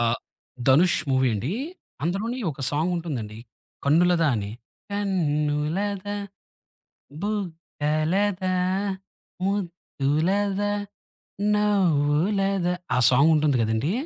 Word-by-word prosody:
ఆహ్, 115 0 +2 0.5
ధనుష్ 165 +6 +5
మూవీ 130 -1 +3
అండి 125 - -2 0.5
అందులోని 205 +9 -1
ఒక 140 -1 -9
సాంగుంటుందండి 150 -9 -2 0.5
'కన్నులదా' 165 +1 +4
అని. 100 -1 -3 0.4
కన్నులదా 185 +1 -1 1.1
బుగ్గలదా 185 0 -1 0.9
ముద్దులదా 195 +2 0 0.8
నవ్వులదా 190 -1 +2 0.2
ఆ - - +3
సాంగుంటుంది 150 +1 +4
కదండీ! 110 - 0
170 Hz, 70 wpm, -25 LUFS, 145-195 Hz, 1.1 s, ధనుష్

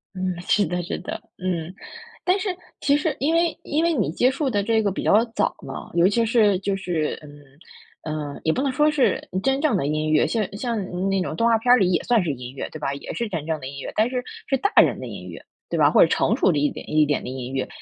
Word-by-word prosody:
嗯， 185 0 -1
是 205 - +3
的 180 +2 -2
是 175 - -4
的， 180 - -6 0.2
嗯。 180 -2 -3 0.5
但 365 +3 +3
是 395 - -2 0.3
其 285 0 +3
实 305 +1 -1
因 300 +4 +1
为 335 -1 +2
因 305 +3 0
为 335 0 +2
你 255 - 0
接 250 +9 +2
触 275 0 -1
的 205 -4 0
这 225 +1 +2
个 205 -2 0
比 190 - -4
较 215 +3 +5
早 - - +1
嘛， - - -8
尤 170 +1 +4
其 230 +4 +2
是 215 -4 +3
就 195 0 -1
是， 175 -5 -2
嗯 145 -1 -13 0.9
呃， - - -9
也 160 - +2
不 - - -1
能 275 - +1
说 295 +4 +3
是 300 -4 +1 0.2
真 270 +2 +1
正 300 -7 +2
的 155 - -1
音 155 +1 -1
乐， 155 - +4
像 220 -4 -1
像 235 0 -2 0.3
那 195 -1 +1
种 180 - -3
动 230 +7 +2
画 230 - +4
片 245 +2 +2
儿 250 - +8
里 185 -5 +2
也 175 - +2
算 235 -5 +2
是 165 - -1
音 125 -1 -8
乐， - - -4
对 155 - -8
吧？ 140 -2 -2
也 140 - -7
是 235 - -2
真 165 -6 -4
正 160 -1 -2
的 130 - -7
音 140 +1 -8
乐， - - -6
但 220 +3 +2
是 250 -1 -2 0.2
是 270 - +1
大 405 - 0
人 - - +1
的 - - -6
音 - - -8
乐， - - -10 0.3
对 - - -1
吧？ - - +5
或 - - +5
者 - - +7
成 - - +2
熟 190 - +3
的 155 - 0
一 145 0 +1
点 - - -9
一 155 0 +4
点 145 0 0
的 - - -6
音 130 0 -6
乐。 135 -1 -1
195 Hz, 290 characters per minute, -23 LUFS, 155-250 Hz, 0.9 s, 儿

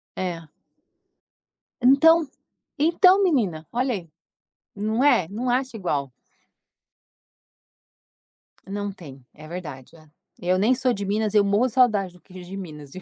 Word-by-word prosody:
É. 170 -4 -5 1.3
Então 305 +6 +5 0.5
então 360 +6 +4
menina, 200 - 0
olha 250 +2 0
aí, 175 -4 -8 0.7
não 220 +5 -1
é. 190 - +3
Não 230 +6 -4
acha 255 0 -1
igual. 145 - -3 2.6
Não 205 +1 -4
tem, 140 -9 -13
é 155 +1 -13
verdade. 150 -6 -8 0.5
Eu 180 +1 +1
nem 220 +7 +3
sou 255 0 +1
de 200 -2 -4
Minas, 210 +1 -1
eu 210 -1 +5
morro 200 +4 +2
a - - 0
saudade 215 -7 +2
do 180 - -20
queijo 180 -1 -13
de 195 - -7
Minas, 150 -7 -9
viu. 185 - -9
200 Hz, 135 wpm, -23 LUFS, 175-250 Hz, 2.6 s, Então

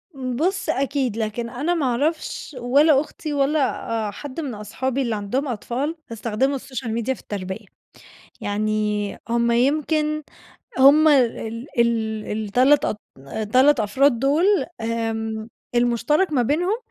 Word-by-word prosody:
بُص، 310 +9 -1
أكيد. 270 -5 0
لكن 230 +1 -3
أنا 285 +8 -1
ما 325 -5 0
أعرفش 290 +4 -2
ولا 275 +4 +4
أختي 300 0 -6
ولا 285 +2 +2 0.5
آآ - - -4
حد 280 +7 -8
من 285 -6 -3
أصحابي 255 +6 -3
اللي 235 -4 -1
عندهم 215 +8 -2
أطفال 255 +6 -3 0.2
يستخدموا 230 +4 0
السوشيال 255 -3 -5
ميديا 235 +3 -1
في - - -13
التربية. 195 +1 -6 0.8
يعني 210 0 -1 0.2
هم 235 0 +2
يمكن 305 +4 +1 0.6
هم 285 +4 +7
ال 235 -3 +1
ال 220 -2 +1
ال3- 245 +7 +3
أط 210 - -2 0.5
3 270 +1 +5
أفراد 235 +4 +2
دول، 285 +7 +2 0.4
آمم 225 -1 -2 0.3
المُشترَك 245 - +2
ما 260 - +3
بينهم 350 - +1
250 Hz, 130 wpm, -22 LUFS, 225-290 Hz, 0.8 s, هم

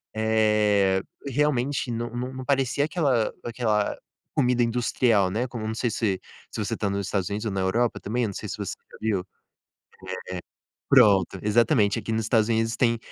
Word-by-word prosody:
eh, 105 -3 +3 0.2
realmente 140 -1 0
não 120 0 -3
não 125 +2 -4
não 130 -1 -7
parecia 140 0 +1
aquela 140 -9 +1
aquela 110 -3 0 0.4
comida 125 -3 +2
industrial, 115 -4 +2
né, 120 +5 -1
como 115 -3 -6
não 110 - -2
sei 115 +1 -1
se 100 -4 -1 0.3
se - - -3
você - - -2
está 100 - -2
nos 100 -1 -2
Estados 95 -1 -1
Unidos 105 +2 -3
ou 105 - -1
na 95 - -1
Europa 115 +6 +1
também, 120 +3 -1
não 100 - -5
sei - - -6
se - - -5
você - - -3 0.2
já - - -12
viu. 110 -4 0
Eh, - - -12 1.7
pronto, 105 -8 +5
exatamente, 110 0 +3
aqui 115 +1 -4
nos 110 - 0
Estados 110 -1 +3
Unidos 115 0 +1
tem 115 -2 +2
115 Hz, 180 wpm, -25 LUFS, 105-125 Hz, 1.7 s, pronto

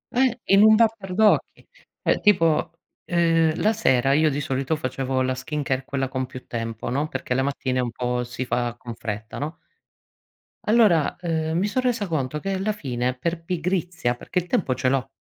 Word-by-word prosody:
Eh, 250 -1 +2
in 195 +1 +7
un 220 +1 +8
batter 215 -4 +1
d' 220 - +1
occhi. 210 - +2 0.4
Cioè - - +2
tipo, 165 -7 +3 0.4
uhm, 165 -2 +3
la 215 +2 +3
sera 135 - +2
io 155 +1 +4
di 145 0 -2
solito 135 +3 -1
facevo 130 -2 -2
la 130 0 0
skincare, 135 0 -3
quella 135 -1 -2
con 130 -1 -3
più 130 0 -10
tempo, 115 -1 -4
no, 145 +4 0
perché 135 -3 -3
le 130 - +1
mattine 135 -2 -1
un 125 -1 0
po' 125 +1 -2
si 125 +1 -5
fa 120 -1 -1
con 120 -1 -8
fretta, 110 -1 -6
no? 150 +3 -4 1.1
Allora, 210 -9 +4
uhm, 160 -2 -1
mi 195 +4 +1
so 255 +5 0
resa 240 -5 0
conto 150 -3 -2
che 195 +3 -2
la 195 +3 0
fine 125 - -2
è 130 - -4
per 165 +4 -3
pigrizia, 175 -6 -1
perché 180 - -2
il 180 - -7
tempo 170 -6 +1
ce 130 - -1
l'ho. 135 0 +1
150 Hz, 195 wpm, -24 LUFS, 130-180 Hz, 1.1 s, un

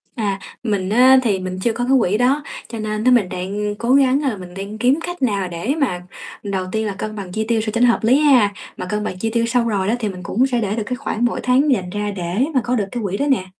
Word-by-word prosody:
À, 200 -5 -1 0.2
mình 200 -4 -1
á 255 +4 +6
thì 205 -5 +1
mình 185 0 -5
chưa 230 +4 0
có 240 +2 -2
cái 255 +2 +2
quỹ 210 -1 +1
đó. 270 +4 +2 0.2
Cho 230 - -7
nên 215 0 -3
á 255 - +4
mình 225 -7 +4
đang 200 +3 -3
cố 235 +4 0
gắng 275 +1 +4
á 280 - +1
là 220 - -4
mình 180 -1 -10
đang 200 +3 -6
kiếm 255 +7 +2
cách 350 -2 -6
nào 200 -6 0
để 175 - -2
mà 255 - -1 0.4
đầu 195 -2 -2
tiên 220 0 -1
là 205 - -2
cân 215 0 -4
bằng 195 -4 -7
chi 220 +3 -2
tiêu 230 -1 +1
sao 215 -1 -3
cho 235 - 0
nó 245 - +6
hợp 235 - +2
lý 255 +5 +4
ha. 250 -9 +4 0.2
Mà - - -4
cân 210 +3 -2
bằng 185 - -4
chi 225 - -1
tiêu 230 -1 +2
xong 235 0 +1
rồi 195 -3 0
đó 220 - +2
thì 215 -3 -1
mình 180 -1 -8
cũng 245 +9 +1
sẽ 245 -3 0
để 205 -1 -1
được 225 - -2
cái 250 - -3
khoản 240 -3 -2
mỗi 240 - -1
tháng 265 +4 +3
dành 185 -8 0
ra 205 +2 -3
để 185 +6 -1
mà 260 - +4
có 245 +1 0
được 210 -5 0
cái 240 -2 -4
quỹ 200 0 -2
đó 285 - 0
nè. 250 -9 +1
220 Hz, 295 wpm, -20 LUFS, 195-250 Hz, 0.4 s, á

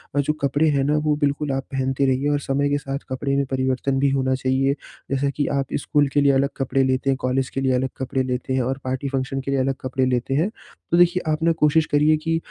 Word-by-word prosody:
अ, 145 - +2
जो 145 +2 +1
कपड़े 145 +3 +2
हैं 135 - +2
ना 150 +2 +1
वो 150 - +3
बिल्कुल 145 0 -1
आप 135 0 -1
पहनते 135 +1 0
रहिए 135 +2 +1
और 145 0 +1
समय 140 0 0
के 145 - +1
साथ 135 -1 -4
कपड़े 140 +1 -1
में 140 - +1
परिवर्तन 130 +1 0
भी 140 0 +3
होना 130 0 +1
चाहिए। 135 +1 +1 0.4
जैसे 140 +1 +1
कि 145 - -2
आप 135 -1 -1 0.2
स्कूल 145 -1 +2
के 145 - +3
लिए 140 -1 +5
अलग 135 +1 +2
कपड़े 135 0 +1
लेते 130 +1 0
हैं, 135 - +2
कॉलेज 130 0 0
के 135 - -3
लिए 130 -1 +2
अलग 130 +1 0
कपड़े 130 0 -1
लेते 125 +1 -3
हैं 130 - +1
और 130 +2 -1
पार्टी, 130 0 -1
फंक्शन 135 0 -2
के 135 - -4
लिए 135 - +1
अलग 135 +1 0
कपड़े 130 0 -1
लेते 125 +1 0
हैं, 170 +8 +1 0.4
तो 170 - +4
देखिए 175 +1 +4
आप 155 +1 -1
ना 165 - +4
कोशिश 150 +1 +4
करिए 150 +1 +4
कि 165 +1 -1
135 Hz, 255 wpm, -22 LUFS, 130-145 Hz, 0.4 s, लिए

